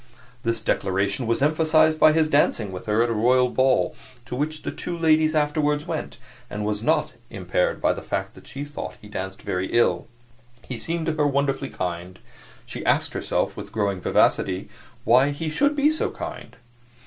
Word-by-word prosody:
This 115 Hz, 0 st, -1 dB
declaration 100 Hz, +2 st, 0 dB
was 115 Hz, +4 st, +1 dB
emphasized 155 Hz, +1 st, +3 dB
by 155 Hz, -, +7 dB
his 155 Hz, 0 st, +2 dB
dancing 130 Hz, -8 st, +2 dB
with 90 Hz, +2 st, -8 dB
her 105 Hz, +2 st, +3 dB
at 120 Hz, -, -1 dB
a -, -, 0 dB
royal 125 Hz, +3 st, +3 dB
ball 130 Hz, +1 st, +2 dB, 0.3 s
to 125 Hz, -, -5 dB
which 155 Hz, +3 st, -3 dB
the -, -, -3 dB
two 175 Hz, -1 st, -5 dB
ladies 155 Hz, -1 st, +3 dB
afterward 150 Hz, 0 st, +1 dB
went, -, -, -5 dB, 0.3 s
and 105 Hz, 0 st, -4 dB
was 105 Hz, 0 st, 0 dB
not 115 Hz, -, +1 dB, 0.2 s
impaired -, -, -1 dB
by -, -, +2 dB
the -, -, -7 dB
fact -, -, -3 dB
that -, -, -16 dB
she 140 Hz, -, -6 dB
thought 145 Hz, 0 st, -7 dB
he 105 Hz, -, -13 dB
danced 95 Hz, -2 st, -6 dB
very 90 Hz, 0 st, -2 dB
ill. 90 Hz, -7 st, +2 dB, 0.6 s
He 125 Hz, -3 st, -5 dB
seemed 165 Hz, 0 st, -2 dB
to 160 Hz, -, 0 dB
her 150 Hz, -1 st, +1 dB
wonderfully 140 Hz, -1 st, 0 dB
kind; 90 Hz, +1 st, -5 dB, 0.5 s
she -, -, -7 dB
asked -, -, +2 dB
herself, -, -, -1 dB
with -, -, -8 dB
growing 100 Hz, -4 st, -1 dB
vivacity, 95 Hz, +1 st, +1 dB, 0.3 s
why 125 Hz, +5 st, +5 dB
he 155 Hz, +2 st, -3 dB
should 285 Hz, -, +2 dB
be 295 Hz, +1 st, +3 dB
so 315 Hz, -, -1 dB
kind. -, -, -8 dB
135 Hz, 185 wpm, -24 LUFS, 105-155 Hz, 0.6 s, by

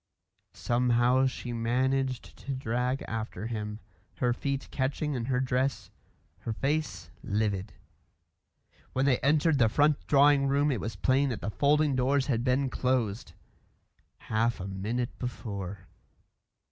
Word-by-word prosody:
Somehow 125 Hz, +2 st, +3 dB
she 125 Hz, -1 st, -5 dB
managed 130 Hz, +2 st, 0 dB
to 140 Hz, -, -4 dB
drag 125 Hz, +1 st, -1 dB
after 110 Hz, -1 st, -4 dB
him, 105 Hz, -2 st, -4 dB, 0.4 s
her 120 Hz, -1 st, +1 dB
feet 140 Hz, +2 st, -3 dB
catching 145 Hz, +3 st, -1 dB
in 120 Hz, -3 st, -2 dB
her 125 Hz, 0 st, 0 dB
dress, 130 Hz, +1 st, -1 dB, 0.5 s
her 115 Hz, -, -4 dB
face 135 Hz, -, -2 dB
livid. 100 Hz, -1 st, -1 dB, 1.2 s
When 130 Hz, +1 st, +1 dB
they 135 Hz, -3 st, +3 dB
entered 150 Hz, +1 st, +3 dB
the 115 Hz, -3 st, +5 dB
front 145 Hz, +5 st, +2 dB
drawing 140 Hz, -1 st, +5 dB
room 140 Hz, +2 st, +2 dB
it 120 Hz, -7 st, -2 dB
was 110 Hz, -1 st, -4 dB
plain 135 Hz, +7 st, +2 dB
that 120 Hz, -, -4 dB
the 105 Hz, -, -3 dB
folding 145 Hz, +3 st, +3 dB
doors 130 Hz, +2 st, +2 dB
had 120 Hz, -5 st, 0 dB
been 130 Hz, +2 st, +2 dB
closed 125 Hz, -5 st, -1 dB, 0.8 s
half 115 Hz, +2 st, 0 dB
a 95 Hz, -, -5 dB
minute 110 Hz, +6 st, -3 dB
before. 100 Hz, -6 st, -5 dB
125 Hz, 135 wpm, -29 LUFS, 115-135 Hz, 1.2 s, the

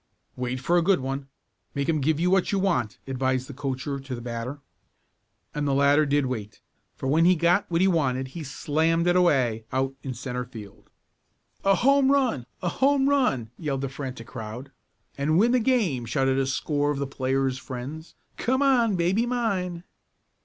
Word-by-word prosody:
"Wait 125 Hz, 0 st, -3 dB
for 170 Hz, +7 st, +2 dB
a -, -, +1 dB
good 190 Hz, +2 st, +3 dB
one. 135 Hz, +1 st, -4 dB, 0.5 s
Make 140 Hz, 0 st, -1 dB
him 155 Hz, -3 st, +1 dB
give 155 Hz, +2 st, +1 dB
you 180 Hz, +2 st, +2 dB
what 190 Hz, -1 st, +2 dB
you 200 Hz, -, +1 dB
want," 175 Hz, -, 0 dB
advised 130 Hz, -1 st, -1 dB
the 140 Hz, -, -8 dB
coacher 140 Hz, 0 st, -3 dB
to 135 Hz, -1 st, -6 dB
the -, -, -7 dB
batter. 120 Hz, +3 st, -5 dB, 0.9 s
And 145 Hz, -1 st, -2 dB
the 135 Hz, -, +1 dB
latter 140 Hz, +2 st, +4 dB
did 145 Hz, 0 st, +2 dB
wait, 110 Hz, -5 st, -5 dB, 0.4 s
for -, -, -7 dB
when 150 Hz, +5 st, +3 dB
he 180 Hz, +1 st, +6 dB
got 175 Hz, +4 st, +2 dB
what 170 Hz, 0 st, +1 dB
he 190 Hz, -, +5 dB
wanted 135 Hz, -7 st, 0 dB
he 165 Hz, +4 st, -7 dB
"slammed 160 Hz, +4 st, 0 dB
it" 175 Hz, 0 st, +3 dB
away 130 Hz, -11 st, +2 dB
out 135 Hz, +1 st, 0 dB
in 130 Hz, -2 st, -5 dB
centre 125 Hz, +1 st, -4 dB
field. 110 Hz, -5 st, -12 dB, 0.7 s
"A 195 Hz, 0 st, +4 dB
home 275 Hz, +5 st, +4 dB
run! 250 Hz, -, +1 dB, 0.2 s
A 175 Hz, -, +1 dB
home 275 Hz, +6 st, +2 dB
run!" 195 Hz, -, +1 dB
yelled 140 Hz, -5 st, -2 dB
the 135 Hz, -, -2 dB
frantic 130 Hz, -3 st, -7 dB
crowd. 120 Hz, +4 st, -8 dB, 0.5 s
"And 155 Hz, +3 st, +2 dB
win 230 Hz, +5 st, +4 dB
the 250 Hz, -, +4 dB
game!" 215 Hz, -, +1 dB
shouted 135 Hz, +3 st, +1 dB
a 135 Hz, -, 0 dB
score 145 Hz, +2 st, 0 dB
of 145 Hz, -, -1 dB
the 140 Hz, -, -1 dB
players' 135 Hz, -1 st, -1 dB
friends. 140 Hz, +6 st, -7 dB, 0.2 s
"Come 260 Hz, +3 st, +1 dB
on, 240 Hz, -6 st, +3 dB
baby 185 Hz, +7 st, +1 dB
mine!" 190 Hz, -8 st, -1 dB
145 Hz, 185 wpm, -26 LUFS, 130-180 Hz, 0.9 s, he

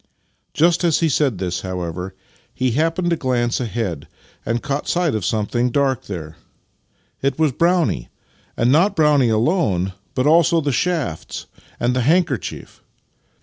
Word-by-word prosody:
Just 170 Hz, +3 st, +3 dB
as 170 Hz, -2 st, +2 dB
he 165 Hz, -, +3 dB
said 140 Hz, -6 st, +1 dB
this, 90 Hz, -1 st, -3 dB
however, 90 Hz, 0 st, -5 dB, 0.4 s
he 130 Hz, -1 st, 0 dB
happened 165 Hz, +6 st, 0 dB
to -, -, +3 dB
glance 120 Hz, -5 st, 0 dB
ahead, 110 Hz, -, -3 dB, 0.4 s
and 115 Hz, +1 st, -2 dB
caught 140 Hz, -1 st, -2 dB
sight 175 Hz, -3 st, +1 dB
of 110 Hz, -3 st, -2 dB
something 115 Hz, +5 st, 0 dB
dark 135 Hz, -1 st, 0 dB
there. 80 Hz, -5 st, -7 dB, 0.8 s
It 135 Hz, -1 st, 0 dB
was 155 Hz, -2 st, +2 dB
Brownie! 165 Hz, -, +1 dB, 0.5 s
And 120 Hz, +2 st, +3 dB
not 185 Hz, +8 st, +3 dB
Brownie 150 Hz, -, +4 dB
alone, 110 Hz, -, +1 dB, 0.2 s
but 130 Hz, -, +1 dB
also 165 Hz, +2 st, +4 dB
the 145 Hz, -2 st, -1 dB
shafts 145 Hz, -, -2 dB, 0.3 s
and 120 Hz, +1 st, +1 dB
the 125 Hz, -, +1 dB
handkerchief! 145 Hz, -, -1 dB
130 Hz, 145 wpm, -20 LUFS, 110-160 Hz, 0.8 s, Brownie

